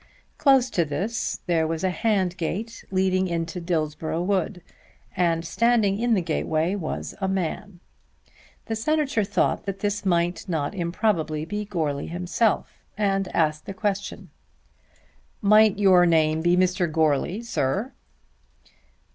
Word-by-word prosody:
Close 265 -3 +4
to 170 - +2
this 185 +11 -3
there 165 -3 +1
was 160 +1 -3
a 185 - +2
hand 195 -4 0
gate 205 +7 -4
leading 185 0 +1
into 170 +1 -3
Dillsborough 160 -1 -2
wood, 185 -1 -1 0.5
and 170 -2 +1
standing 220 -1 +2
in 235 -1 +2
the 185 - 0
gateway 160 +1 0
was 180 -6 -4
a 190 - +1
man. 190 0 -3 0.9
The 225 - -3
Senator 280 -1 0
thought 200 0 0
that 195 0 -4
this 205 0 -1
might 175 0 0
not 155 -2 -1
improbably 170 -4 -1
be 210 +5 -4
Goarly 155 -8 -2
himself, 180 +6 -1 0.2
and 195 -2 +1
asked 155 -2 0
the 195 - -6
question, 200 0 -3 1.1
"Might 215 -1 +5
your 185 -3 +5
name 160 -1 +3
be 175 +1 +3
Mr. 180 -2 +1
Goarly, 160 - +1
sir?" 195 - -1
185 Hz, 130 wpm, -24 LUFS, 165-205 Hz, 1.1 s, Might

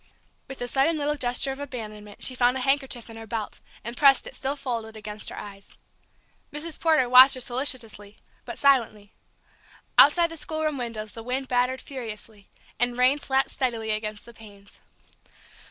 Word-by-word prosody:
With 270 - -9
a - - -3
sudden 275 +6 +1
little 295 0 -1
gesture 250 0 0
of 270 - -7
abandonment 215 -7 -8
she 260 - 0
found 250 0 +2
a - - -4
handkerchief 270 -3 -1
in 225 -1 -11
her 225 0 -10
belt, 220 -1 -5 0.2
and 235 +2 -5
pressed 275 0 +5
it, - - -8
still 270 +2 -3
folded, 230 -5 -5
against 210 0 -5
her - - -9
eyes. 200 -1 -11 0.8
Mrs. 310 +2 -4
Porter 315 -6 +3
watched 255 +2 +8
her - - -7
solicitously, 240 -5 0 0.3
but - - -8
silently. 230 -7 +1 0.9
Outside 335 +3 +6
the 330 - -8
schoolroom 310 -2 -3
windows 220 -3 -5
the 225 - -8
wind 255 +3 -3
battered 250 +1 0
furiously, 220 -5 -8 0.3
and 245 0 +1
rain 255 +3 +3
slapped 270 -1 0
steadily 230 -4 -2
against 215 -1 -3
the 235 - -13
panes. 200 -3 -16
245 Hz, 170 wpm, -25 LUFS, 220-270 Hz, 0.9 s, watched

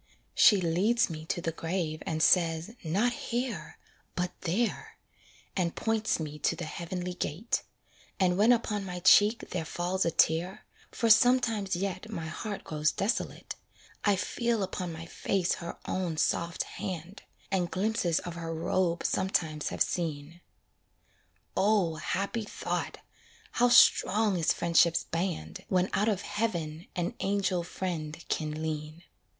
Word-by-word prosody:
She 205 -4 +6
leads 185 +6 +2
me 155 0 -7
to 175 - -1
the 165 - -1
grave 165 -1 -3
and 160 0 0
says, 165 +2 +3
"Not 200 +10 +1
here, 235 -11 -4 0.4
But 180 0 -1
there," 210 +8 -1 0.6
and 175 -3 0
points 220 -3 0
me 150 -1 -5
to 165 - +1
the 175 0 -5
heavenly 180 +3 -4
gate; 180 +5 -2 0.6
And 180 -2 +3
when 210 +5 +5
upon 215 -4 +1
my 180 -2 -6
cheek 205 +4 +5
there 180 -3 -2
falls 175 +4 -1
a - - +2
tear 165 +3 +1 0.2
(For 230 - -1
sometimes 225 -5 +4
yet 195 +3 -3
my 170 -7 -4
heart 200 +6 -5
grows 155 0 0
desolate), 215 +5 -2 0.5
I 205 -1 +4
feel 235 +2 -1
upon 185 -2 -4
my 165 0 -7
face 180 +1 0
her 170 - -6
own 180 -4 -2
soft 170 +2 0
hand, 185 -1 -6 0.3
And 180 -3 +1
glimpses 185 -4 0
of 175 - -6
her 165 -1 -5
robe 170 +1 0
sometimes 160 -5 0
have - - +2
seen. 165 0 -4 1.1
O, 195 -6 +2
happy 200 +8 -2
thought! - - -3 0.5
how 245 0 +3
strong 215 -3 +5
is 165 -3 +2
friendship's 170 0 +3
band, 165 - -3
When 185 0 +1
out 210 +3 +2
of 200 -3 -1
heaven 170 -7 -3
an 175 +5 -1
angel 195 -2 0
friend 165 -4 -4
can 155 0 -2
lean. 155 +1 -4
180 Hz, 140 wpm, -29 LUFS, 165-205 Hz, 1.1 s, She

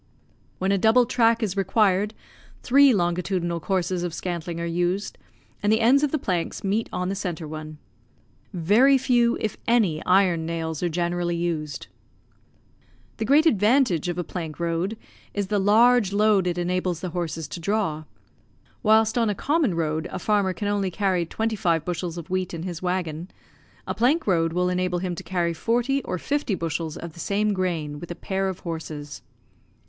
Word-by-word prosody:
When 190 +1 0
a 200 - +2
double 225 +5 +5
track 230 -1 +2
is 200 -3 -1
required, 200 +1 +2 0.5
three 275 +2 +6
longitudinal 175 -2 0
courses 185 0 -1
of 175 -2 -3
scantling 170 -2 -4
are 170 - -2
used, 175 +4 -1 0.5
and 205 - +2
the 220 - +3
ends 250 +5 +5
of 295 - +2
the 310 - 0
planks 180 - -2
meet 205 +3 0
on 180 0 -2
the - - -1
centre 180 -5 -4
one. 155 0 -7 0.7
Very 210 +10 +4
few, 245 -3 +2
if 215 - -3
any, 215 -10 +2
iron 180 -3 +3
nails 160 -2 -3
are 175 - 0
generally 175 +1 -1
used. 165 -3 -3 1.3
The 220 - -2
great 295 +5 +4
advantage 215 - +3
of 175 - -3
a 175 - -1
plank 165 -3 -6
road 170 +5 -1 0.4
is 205 -1 0
the 205 - +1
large 220 +1 +4
load 205 -2 +3
it 175 0 -1
enables 180 -1 -1
the 185 - -3
horses 165 -2 -4
to - - -6
draw. 165 -4 -1 0.8
Whilst 220 +1 +3
on 230 -2 +2
a 205 - -1
common 285 - +1
road 160 0 -1
a - - -4
farmer 200 0 +1
can 205 +2 -4
only 200 -2 0
carry 185 -2 0
twenty 225 +4 -2
five 170 -5 0
bushels 175 -1 -3
of 170 - -7
wheat 185 -1 -2
in 165 - -6
his 175 -3 -5
waggon, 180 -2 -3 0.6
a - - -2
plank 285 +8 +2
road 165 -4 +2
will 180 +2 0
enable 180 0 0
him 180 0 -2
to 170 - -6
carry 175 -2 -1
forty 245 +9 0
or 180 - -4
fifty 285 0 -1
bushels 165 -1 -3
of 170 -1 -8
the 170 - -14
same 205 +3 0
grain 165 -6 -2
with 175 - -9
a 175 - -5
pair 190 +1 -2
of 185 - -6
horses. 155 -3 -6
185 Hz, 180 wpm, -24 LUFS, 170-215 Hz, 1.3 s, three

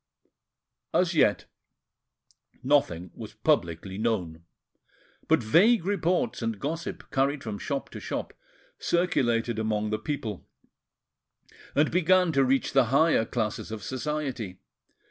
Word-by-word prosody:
As 180 0 +3
yet, 125 -10 +3 1.2
nothing 90 - +1
was 110 -2 -9
publicly 95 - 0
known; 90 -8 -2 0.8
but - - +3
vague 185 - +4
reports 180 - 0
and 115 -3 -2
gossip, 160 +4 -5
carried 135 +1 +1
from 105 -3 -5
shop 140 -2 -3
to - - -7
shop, - - -4 0.5
circulated 120 -10 +1
among 110 -1 -1
the 110 - -1
people, 110 -5 -4 1.3
and 150 +2 +3
began 180 0 +4
to 135 -3 +3
reach 135 +1 +1
the 135 -2 +5
higher 140 0 +3
classes 110 -3 -3
of 110 -2 -6
society. 130 -7 -4
130 Hz, 115 wpm, -27 LUFS, 110-155 Hz, 1.3 s, the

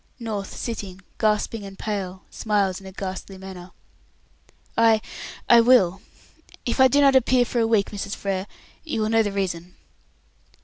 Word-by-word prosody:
North, 215 -5 -5
sitting, 195 -5 -5 0.2
gasping 215 0 0
and 195 -1 -9
pale, 190 -3 -4
smiles 200 -3 0
in 190 - -11
a - - -8
ghastly 190 0 -6
manner. 185 -1 -9 1.1
"I 225 -1 +5 0.5
I 235 -1 +8
will. 215 -7 +4 0.6
If 240 - -1
I 260 - +8
do 285 +3 +3
not 275 -1 +5
appear 255 -1 +4
for 240 - -2
a 225 - +2
week, 220 -3 +2
Mrs. 200 -1 -4
Frere, 195 0 -3 0.4
you 305 -9 -2
will 215 - 0
know 225 0 +4
the 205 -2 -1
reason." 180 -3 -3
205 Hz, 160 wpm, -24 LUFS, 190-230 Hz, 1.1 s, I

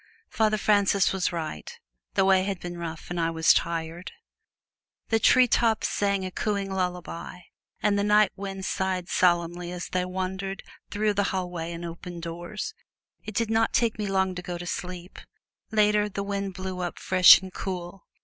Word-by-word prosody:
Father 215 -1 +2
Francis 200 -2 +3
was 190 -2 0
right: 160 - -6 0.4
the 190 - +4
way 190 -1 +5
had 195 -2 -3
been 175 0 -6
rough 165 0 -7
and 175 - -2
I 165 0 +1
was 160 -1 +4
tired. 165 +1 -2 1.0
The 225 - +3
treetops 230 -1 +4
sang 200 -2 0
a 185 - -5
cooing 200 0 -2
lullaby 180 -1 -4 0.4
and 205 -1 +2
the - - +1
nightwinds 200 -2 +1
sighed 185 -1 -2
solemnly 175 0 +1
as 180 -1 -6
they 180 -1 0
wandered 190 +1 -4 0.3
through 210 0 0
the 200 0 +1
hallway 180 -3 -3
and 170 0 -6
open 170 +1 -7
doors. 170 - -6 0.5
It 215 -1 -7
did 230 0 0
not 225 0 +2
take 230 -2 +1
me 210 - -1
long 190 -1 +1
to 180 - -6
go 175 -1 -5
to 175 - -7
sleep. 180 +1 -6 0.5
Later, 210 -1 +3
the 200 0 -4
wind 200 -1 -3
blew 185 0 -5
up 175 -1 -3
fresh 185 -1 +8
and 190 -1 -10
cool. 180 0 -6
190 Hz, 170 wpm, -26 LUFS, 175-200 Hz, 1.0 s, fresh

